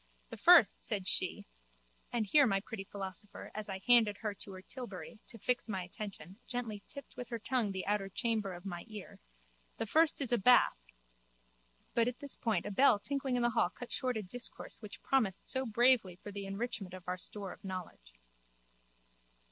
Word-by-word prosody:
The - - -6
first, - - +7
said - - -3
she - - 0 0.7
(and 235 -3 0
here 280 +6 +6
my 195 -3 +2
pretty 200 0 -6
philosopher, 195 +1 -7
as 215 -1 -4
I 190 0 -5
handed 230 -4 +5
her 210 -2 -3
to 200 0 -10
her 185 0 -9
tilbury, 230 -3 -8
to 235 - -9
fix 245 +2 0
my 190 -3 -2
attention, 190 0 -8
gently 235 -5 -3
tipped 280 - -10
with 245 -2 -6
her 235 - -2
tongue 230 -2 0
the 190 -1 -4
outer 205 -1 0
chamber 215 -3 0
of 175 +2 -11
my 175 -3 -5
ear), 215 -4 -9 0.6
the - - -1
first 315 +8 +4
is 265 -4 -1
a 240 - +4
bath... 245 - +6 1.1
But 235 0 +3
at 245 -1 -2
this 285 -1 -1
point 225 -2 0
a 205 - -3
bell 250 +1 +6
tinkling 270 +3 -2
in 245 - +1
the 240 - +3
hall 175 - +3
cut 245 +6 -9
short 255 -3 0
a 215 - -3
discourse 235 +5 -4
which 210 -2 -9
promised 220 -9 +1
so 260 0 0
bravely 230 -4 +4
for 205 +3 -9
the 200 0 -5
enrichment 195 -2 -4
of 185 -1 -12
our 180 - 0
store 195 +1 -6
of - - -18
knowledge. 180 - -7
210 Hz, 190 wpm, -34 LUFS, 195-245 Hz, 1.1 s, first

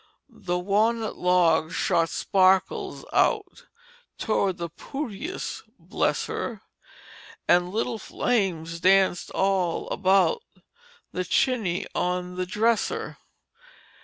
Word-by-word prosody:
"The 175 -1 -3
wa'nut 215 +4 +1
log 170 -3 +3
shot 165 -1 +1
sparkles 190 -1 +1
out 415 -6 +1 0.5
Towards 200 -4 0
the 170 -2 -5
pootiest 275 - -5 0.2
bless - - -1
her! - - -5 0.8
An' 175 0 +4
little 225 +2 -2
flames 170 -11 -1
danced 190 0 +3
all 190 -3 0
about 195 - +3 0.7
The 185 - -2
chiny 190 -1 0
on 180 0 -2
the 185 0 -3
dresser. 220 +4 0
190 Hz, 95 wpm, -25 LUFS, 180-220 Hz, 0.8 s, An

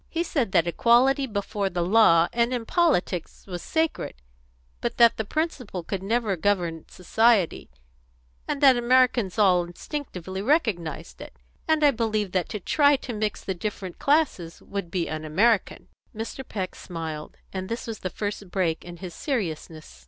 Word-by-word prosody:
He 335 0 -1
said 275 - -1
that 170 - +3
equality 250 - +3
before 200 -2 -2
the 175 -1 -1
law 175 -4 +5
and 235 +1 +2
in 245 -2 -2
politics 220 - 0
was 180 -3 -6
sacred, 320 0 -1 0.6
but - - -3
that 235 -1 +6
the 220 - -1
principle 250 - -3
could 190 +3 -4
never 215 0 0
govern 175 -3 -1
society, 215 0 +2 0.8
and 280 - -2
that 270 -3 +7
Americans 240 -5 +3
all 185 -4 +4
instinctively 190 - -6
recognised 200 - -1
it. - - -11 0.3
And 315 -1 +2
I 290 - +7
believe 215 -5 -1
that 185 -2 -1
to 210 - -4
try 285 - +4
to 260 -2 -6
mix 210 -1 -2
the 190 - -2
different 185 -1 -5
classes 275 - +1
would 200 -4 -5
be 170 -1 -1
un 155 0 -4
American." 195 +7 +1 0.3
Mr. 225 +4 -5
Peck 190 -7 -4
smiled, 160 -3 -7 0.2
and 190 -1 -4
this 230 +2 -4
was 225 -2 -6
the 185 - -3
first 205 0 -5
break 175 -4 -1
in 175 0 -9
his 180 -1 -8
seriousness. 160 - -4
205 Hz, 160 wpm, -25 LUFS, 175-240 Hz, 0.8 s, that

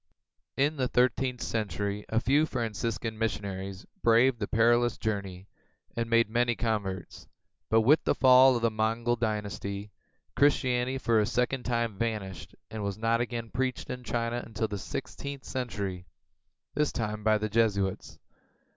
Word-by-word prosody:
In 145 +3 +2
the 130 -2 +1
thirteenth 125 0 +1
century 105 -1 -2
a 115 - +2
few 145 +6 +3
Franciscan 115 -2 -3
missionaries 100 -3 -3 0.2
braved 120 +2 +4
the 100 - -2
perilous 120 +1 +3
journey 100 -3 -4 0.5
and 115 -1 -2
made 115 -1 +4
many 120 +2 +1
converts, 100 -6 -3 0.4
but, 110 0 +5
with 145 +8 +4
the - - +1
fall 130 0 +7
of 120 - -2
the 115 - +3
Mongol 115 +2 0
dynasty, 105 -2 -3 0.4
Christianity 130 -2 +2
for 115 -4 +2
a 105 - +2
second 125 +2 0
time 115 -4 -1
vanished 105 -7 -4 0.2
and 110 - -5
was 100 -1 -3
not 115 +1 +1
again 115 -1 -4
preached 130 0 -2
in 125 0 -6
China 120 0 -2
until 110 0 -3
the 105 -1 -5
sixteenth 140 +6 -6
century, 100 -7 -4 0.7
this 150 -1 +1
time 105 -2 -3
by 110 0 +4
Jesuits. 105 -3 0
115 Hz, 145 wpm, -29 LUFS, 105-120 Hz, 0.7 s, fall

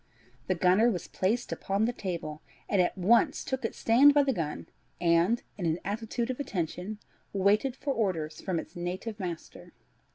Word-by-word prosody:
The 185 - +1
gunner 185 +7 +4
was 185 -7 -3
placed 225 +6 -1
upon 200 +3 0
the 240 - 0
table, 165 -7 -5 0.3
and 200 -3 +3
at 180 - 0
once 235 - +3
took 265 -1 -3
its 225 - -3
stand 275 +6 +6
by 290 - +6
the 270 -1 +1
gun, 160 -7 -3 0.3
and, 170 +7 +3 0.2
in 175 - 0
an 160 0 +1
attitude 225 +4 -2
of 255 - -6
attention, 185 - -3 0.4
waited 205 +6 +2
for 275 0 -2
orders 165 -9 -2
from 185 -3 -2
its - - -6
native 185 +5 -4
master. 175 -4 -7
200 Hz, 170 wpm, -29 LUFS, 175-235 Hz, 0.4 s, stand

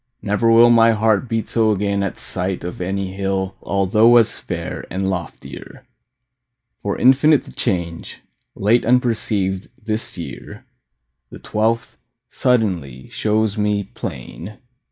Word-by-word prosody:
Never 105 +3 +1
will 120 +1 +7
My 115 -1 +5
heart 110 +2 +1
beat 115 -2 -1
so 110 -2 +2
again 100 -1 0
at 100 -3 -3
sight 90 0 -4
Of 90 +1 -6
any 95 +1 -3
hill 95 -1 -2
although 105 +5 +4
as 115 - +2
fair - - -5
And 95 +1 -2
loftier. 90 -3 -8 1.0
For 100 - -2
infinite 140 +3 +4
The - - -13
change, 85 -3 -3 0.3
late 110 +5 +2
unperceived, 110 -6 0
this 110 -3 -4
year, 70 -7 -9 0.6
The - - -10
twelfth, 115 +2 -1 0.3
suddenly, 90 - -1
shows 110 0 0
me 105 -1 +1
plain. 85 - -7
105 Hz, 125 wpm, -20 LUFS, 95-115 Hz, 1.0 s, will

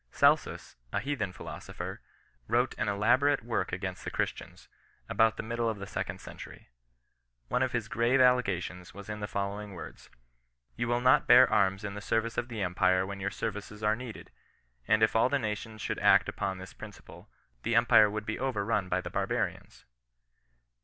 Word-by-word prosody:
Celsus, - - +2
a - - 0
heathen 130 -9 -2
philosopher, - - -7 0.5
wrote 125 +2 +1
an 110 - 0
elaborate 120 +7 +3
work 115 0 -2
against 95 0 -4
the - - -3
Christians, - - -4 0.4
about 110 0 +3
the - - -4
middle 115 +1 -1
of 110 - -3
the 100 - -6
second - - -4
century. - - -11 0.8
One 125 - +1
of 130 -1 +1
his 115 -3 -2
grave 120 +4 +2
allegations 95 -9 +1
was 100 0 -10
in 105 0 -4
the 105 - -4
follow 100 +1 -3
ing 105 -1 -9
words: 85 - -10 0.2
— - - -45
" - - -45
You 120 - -2
will 120 +1 +1
not 125 +1 +4
bear - - +8
arms 95 +1 +2
in 100 -1 -4
the 105 - -7
service 115 +2 -1
of 120 - -3
the 115 -4 -4
empire 90 +1 +2
when 100 0 -6
your 100 +1 -1
services 105 0 -5
are 105 0 +3
needed, 120 -1 -9 0.6
and 110 +1 +4
if 110 - +3
all 115 +3 +4
the 140 - +2
nations 110 -2 -4
should - - -2
act - - +5
upon 95 -1 -3
this 95 +1 -10
principle, - - -12 0.3
the 115 +1 0
empire 115 -2 +6
would 110 +1 -4
be 110 - -3
overrun 110 -6 -1
by 95 +1 +1
the - - -7
barbarians." - - -3
105 Hz, 185 wpm, -30 LUFS, 100-120 Hz, 0.8 s, bear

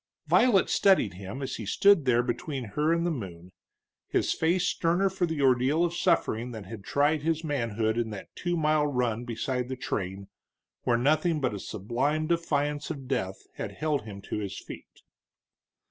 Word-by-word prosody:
Violet 225 -7 +4
studied 190 - +3
him 100 +9 -7
as 130 - -4
he 110 - -6
stood 200 - +5
there 120 -1 +3
between 135 +2 -3
her 150 +5 +2
and 170 0 +1
the 175 - +1
moon, 90 - -7 0.6
his - - +1
face 170 +3 +1
sterner 180 +3 +1
for 185 -2 0
the 160 -3 -2
ordeal 135 +6 +3
of 170 - -2
suffering 165 -10 +1
that 110 -3 -7
had 105 0 -9
tried 145 +8 +2
his 160 +1 0
manhood 115 -6 -1
in 115 -1 -1
that 105 -2 -9
two 175 -1 -1
mile 155 -1 +2
run 125 -4 -1
beside 125 +1 -2
the 130 - -3
train, 100 -5 -4 0.6
where 120 -1 +3
nothing 155 +5 +2
but 130 -5 0
a 100 - -4
sublime 120 +11 -1
defiance 150 -3 0
of 140 -5 -6
death 95 -8 -2
had - - -4
held 150 -2 -1
him 100 -2 -9
to - - -4
his 100 -2 -5
feet. - - -11
135 Hz, 175 wpm, -28 LUFS, 110-160 Hz, 0.6 s, stood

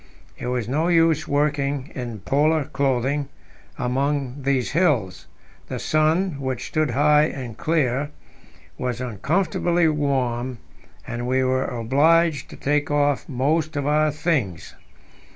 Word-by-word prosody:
It - - -6
was 125 -3 -1
no 155 +7 0
use 165 -2 +3
working 145 -1 0
in 120 -5 -6
Polar 150 +7 +2
clothing 140 0 -1 0.5
among 135 +1 -1
these 135 -2 0
hills; 140 - +1 0.4
the - - -4
sun, 155 +1 +1
which 130 -2 -3
stood 155 -1 +1
high 150 +4 +4
and 130 -7 -5
clear, 145 -1 0 0.7
was 125 -2 -2
uncomfortably 165 - 0
warm, 130 -5 -1 0.5
and 120 +1 -4
we 130 +1 +2
were 130 0 +1
obliged 145 +7 +2
to - - -10
take 145 +1 0
off 145 -1 +1
most 150 +5 0
of 145 -1 -1
our 155 +1 +3
things. 145 - -2
140 Hz, 125 wpm, -23 LUFS, 125-155 Hz, 0.7 s, high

